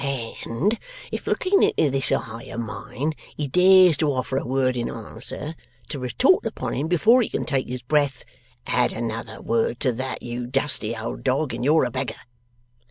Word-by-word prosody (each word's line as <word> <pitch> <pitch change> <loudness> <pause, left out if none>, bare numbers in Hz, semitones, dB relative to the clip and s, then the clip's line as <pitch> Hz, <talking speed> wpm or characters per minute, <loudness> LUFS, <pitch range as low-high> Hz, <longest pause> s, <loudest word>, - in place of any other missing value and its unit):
And, 195 - 0 0.3
if - - -5
looking 390 +2 +2
into 150 - +3
this 135 0 0
eye 115 +1 -2
of 115 - -5
mine, 125 +6 -4 0.2
he 150 - -2
dares 180 +1 +6
to 150 -1 +2
offer 130 0 -2
a 135 - -2
word 130 0 +1
in 120 -1 -2
answer, 115 +7 -5 0.4
to 145 - -4
retort 125 -2 +3
upon - - -3
him 145 +4 -1
before 215 +9 +5
he 225 - -1
can - - -2
take 135 -4 0
his 125 -1 -5
breath, 140 -1 +1 0.4
"Add 125 +1 +1
another 115 -1 -4
word 115 +1 0
to 130 - +3
that, 130 +3 -5
you 120 0 -4
dusty 125 -4 +1
old 110 +1 -5
dog, 130 0 0
and 120 +1 -4
you're 150 +1 +4
a 125 - -3
beggar." 130 +2 -3
130 Hz, 180 wpm, -24 LUFS, 120-150 Hz, 0.4 s, dares